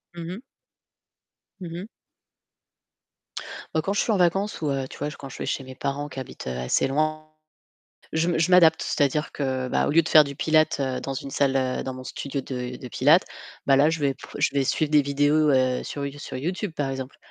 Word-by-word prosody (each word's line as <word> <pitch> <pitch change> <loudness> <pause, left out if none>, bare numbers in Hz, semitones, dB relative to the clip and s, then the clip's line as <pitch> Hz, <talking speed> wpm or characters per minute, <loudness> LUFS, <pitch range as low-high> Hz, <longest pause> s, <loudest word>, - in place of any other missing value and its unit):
Mmh 170 -1 -6
mh. 245 - -12 1.2
Mmh 170 -2 -6
mh. 180 +4 -5 1.9
Bah, 160 - +2
quand 195 +5 -1
je 205 - +2
suis - - 0
en 210 - +2
vacances 195 +3 +1
ou, 150 - 0
heu, 135 -1 -1
tu - - -12
vois, 145 - -2
j 150 - -9
quand 135 - -9
je - - -10
vais - - -4
chez 135 - -2
mes 130 - -9
parents 140 +2 -3
qui 135 - -7
habitent, 130 - -8
heu, 65 - -3
assez 65 - +1
loin, 155 +2 -1 0.9
je 165 +2 +1
me 170 - +1
je 170 +3 +2
m'adapte, 165 -3 +6
c'est-à-dire 150 +1 0
que, 130 -2 -2
bah, - - +1
au - - -1
lieu 165 +3 +6
de 160 - -6
faire 155 -1 +8
du 140 -1 -6
pilates, 155 0 +2
heu, 130 -2 -1
dans 135 - -4
une 135 +1 -5
salle, 135 -1 +1
heu, 130 -1 -1
dans 130 - -4
mon 130 0 -9
studio 140 +2 -4
de 125 -1 -5
de 125 - -8
pilates, 150 +8 +4 0.4
bah 135 - +5
là, 145 +3 +5
je 160 -1 -1
vais 140 -2 +1
p - - -21 0.2
je - - +3
vais 140 -1 +2
suivre 155 +3 0
des 150 -1 +6
vidéos, 145 +2 +2
heu, 130 -1 +2
sur 140 -1 -4
You 140 +1 -6
sur 130 - -6
YouTube, 180 +7 -3
par 145 -3 -2
exemple, 130 0 -6
145 Hz, 230 wpm, -25 LUFS, 135-160 Hz, 1.9 s, faire